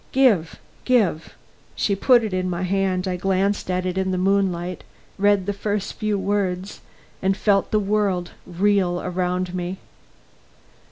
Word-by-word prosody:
"Give 220 -12 +3 0.3
give 200 -11 +1 0.2
" - - -33
She 200 - +1
put 240 +4 +4
it 215 -3 -3
in 185 0 -1
my 175 0 -2
hand. 190 0 0
I 180 -1 -1
glanced 195 +2 0
at 180 0 -1
it 185 +1 -1
in 190 0 0
the 185 - 0
moonlight, 185 -2 0 0.4
read 205 -1 +3
the 205 - -1
first 205 0 -3
few 215 -1 -1
words, 195 -1 -2 0.4
and 195 +1 +1
felt 200 -2 +2
the 215 - +2
world 195 -3 0 0.2
reel 185 -1 +1
round 180 0 -1
me. 180 +1 -3
190 Hz, 155 wpm, -22 LUFS, 180-205 Hz, 0.4 s, put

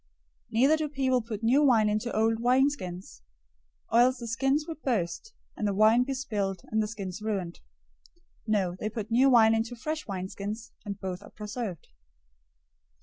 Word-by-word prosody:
009:017 - - -16
Neither 270 +7 +4
do 310 -1 -2
people 260 -3 +1
put 220 -1 -6
new 255 +6 +4
wine 235 -7 +4
into 215 +3 -1
old 225 +1 +2
wineskins, 245 - 0 0.7
or 230 - +5
else 255 +2 +4
the 235 - -7
skins 270 +6 +1
would 320 -2 -7
burst, 230 - -2 0.2
and 210 - -1
the 200 - -1
wine 215 +4 +5
be 270 0 -3
spilled, 205 -8 -2
and 220 0 +2
the 215 - -1
skins 200 -3 -6
ruined. 195 -5 -3 0.9
No, 195 -5 +1
they 215 - -2
put 220 0 -6
new 260 +4 +5
wine 225 -3 +6
into 225 +2 -1
fresh 310 +6 -4
wineskins, 200 +3 -5
and 200 -1 -5
both 185 0 -5
are 205 - -13
preserved." 210 - -6
225 Hz, 170 wpm, -28 LUFS, 205-255 Hz, 0.9 s, wine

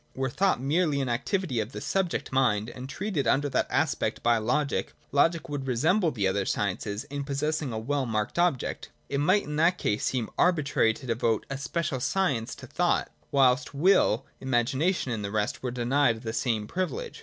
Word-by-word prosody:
Were 130 -1 -1
thought! 190 -4 +2
merely 150 +2 +1
an 135 -2 -1
activity 135 - -1
of 110 +4 -3
the - - -5
subject 190 -3 -1
mind 120 -4 +1
and 130 +1 -8
treated 160 - -2
under 145 +5 +3
that - - 0
aspect - - 0
by 120 -1 +4
logic, 140 +6 -1 0.2
logic 165 +3 +2
would 145 -3 -4
resemble 160 - +2
the 105 -9 0
other 100 +1 0
sciences 100 +2 -2
in 145 0 -3
possessing 145 0 -2
a 110 - -3
well 135 +4 -1
marked 110 +6 -2
object. 175 -8 0 0.2
It 140 - -1
might 185 +8 +3
in 150 0 -5
that 170 +3 +3
case 105 -8 -1
seem 125 -4 -1
arbitrary 145 -10 +3
to - - -11
devote 115 -2 0
a 135 - -2
special 145 -1 -2
science 130 -4 0
to - - -11
thought, - - 0 0.2
whilst 130 -1 +3
will, 140 - +3
imagination 130 +5 0
and 110 -3 -3
the 100 - -3
rest 105 0 -1
were 130 - -2
denied 120 -1 +1
the 110 -1 -4
same 110 -2 0
privilege. 185 - -4
135 Hz, 185 wpm, -27 LUFS, 115-155 Hz, 0.2 s, by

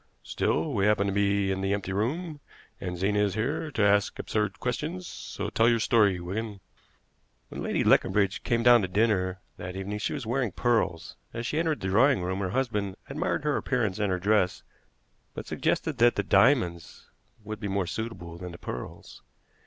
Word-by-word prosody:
Still, 155 - -1
we 100 -2 +2
happen 105 -1 +3
to 100 - -1
be 100 -1 +2
in 95 0 -2
the 95 +1 0
empty 100 -2 -4
room, 150 - -2 0.4
and 90 0 -4
Zena 100 +3 +1
is 100 -2 +1
here 145 +8 -1
to 115 -7 0
ask 100 0 +3
absurd 105 -1 -2
questions; 160 +8 -3
so 100 -9 -6
tell 115 +1 +4
your 120 - +3
story, 105 -5 +3
Wigan." 100 +4 -4 0.9
"When - - -7
Lady - - 0
Leconbridge 100 -2 +3
came 115 -1 0
down 120 -1 +7
to 95 - -1
dinner 95 -2 +1 0.2
that 90 +1 -6
evening 100 +2 -4
she - - -2
was 140 -5 -5
wearing 120 -3 -1
pearls. 105 -9 0 0.2
As 115 0 -3
she 150 - -1
entered 160 -2 0
the 95 - -2
drawing 110 +2 +4
room 95 +2 -2
her 95 -2 -1
husband 105 -4 -1 0.2
admired - - -1
her 150 -2 +1
appearance 110 -7 -1
and 105 -1 +1
her 90 - +1
dress, 100 0 +1 0.7
but - - -6
suggested - - -1
that 120 +1 +5
the 100 - 0
diamonds 100 - +2 0.3
would 110 0 -6
be 105 - -4
more 100 -1 0
suitable 90 -4 -6
than 90 -1 -7
the - - -9
pearls. 60 - -8
105 Hz, 185 wpm, -27 LUFS, 95-120 Hz, 0.9 s, down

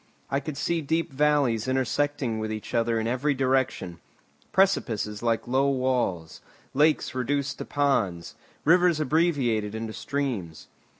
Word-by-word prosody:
I 135 - +2
could 140 0 -6
see 170 +2 0
deep 160 0 -1
valleys 140 -5 +2
intersecting 130 -2 0
each 110 -1 -6
other 115 -1 +1
in 110 - -2
every 130 +5 0
direction, 130 -9 0 0.5
precipices 115 - +1
like 115 -1 0
low 135 +3 +2
walls, 125 -11 -1 0.3
lakes 150 +3 +2
reduced 140 +2 -1
to - - -4
ponds, 100 - 0 0.3
rivers 175 0 +4
abbreviated 135 -9 +1
into 110 0 -4
streams. 110 - -4
130 Hz, 125 wpm, -26 LUFS, 110-145 Hz, 0.5 s, rivers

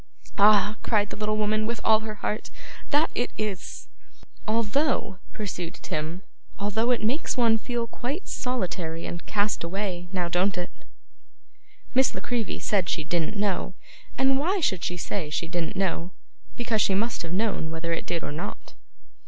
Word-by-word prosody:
'Ah!' 210 +1 +6
cried 210 -2 +2
the - - -3
little 215 0 0
woman 215 0 +2
with 235 0 -2
all 220 -1 +6
her 220 -1 -5
heart, 210 +1 -2 0.4
'that 300 +2 +3
it 245 - 0
is!' 210 -4 -4 0.6
'Although,' 230 -1 +1
pursued 180 -5 -4
Tim 160 +5 -3 0.3
'although 210 +4 +1
it 245 -3 +2
makes 255 +8 +1
one 230 -2 +5
feel 240 +1 -1
quite 265 - -4
solitary 180 -10 -2
and 170 -1 -5
cast 205 -2 +1
away. 180 0 -2
Now 180 -2 0
don't 180 +3 +2
it?' 175 0 -3 1.2
Miss 260 0 +4
La - - -2
Creevy 240 -3 -1
said 190 -5 +1
she 155 - 0
didn't 170 +5 0
know. 200 -2 0 0.4
And 265 +1 +4
why 370 +7 +2
should 190 - +1
she 180 - -1
say 175 -2 -2
she 165 +2 -1
didn't 175 +3 -2
know? 185 -2 0 0.5
Because 230 -3 +1
she 195 - +3
must 230 +4 0
have 165 - -5
known 195 -4 0
whether 165 +1 -2
it 165 - -2
did 170 -2 -1
or - - -3
not. 150 - -6
205 Hz, 165 wpm, -27 LUFS, 175-230 Hz, 1.2 s, Ah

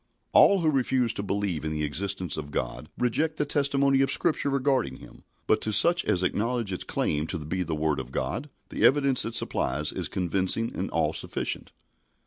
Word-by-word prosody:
All 200 -2 +6
who 160 -2 +2
refuse 130 -3 +1
to 100 - -4
believe 100 -5 -2
in 80 - -2
the 75 -1 -2
existence 95 +2 -2
of 75 -2 -6
God - - -4
reject 155 +6 0
the 150 - 0
testimony 140 -1 +2
of 135 0 +2
Scripture 155 -3 +2
regarding 135 - 0
Him, - - -15 0.2
but 110 - +2
to 110 - -2
such 170 - +4
as 95 - +1
acknowledge 115 +1 -1
its 90 - -3
claim 75 +1 -1
to 90 - -3
be 80 +4 -4
the 80 -3 -2
Word 75 -2 0
of 65 -1 -7
God, 115 - -3 0.2
the - - -3
evidence 135 -2 +4
it 115 0 -4
supplies 75 -8 -1
is - - -4
convincing 95 +5 0
and - - -3
all - - 0
sufficient. - - -3
105 Hz, 190 wpm, -26 LUFS, -, 0.2 s, All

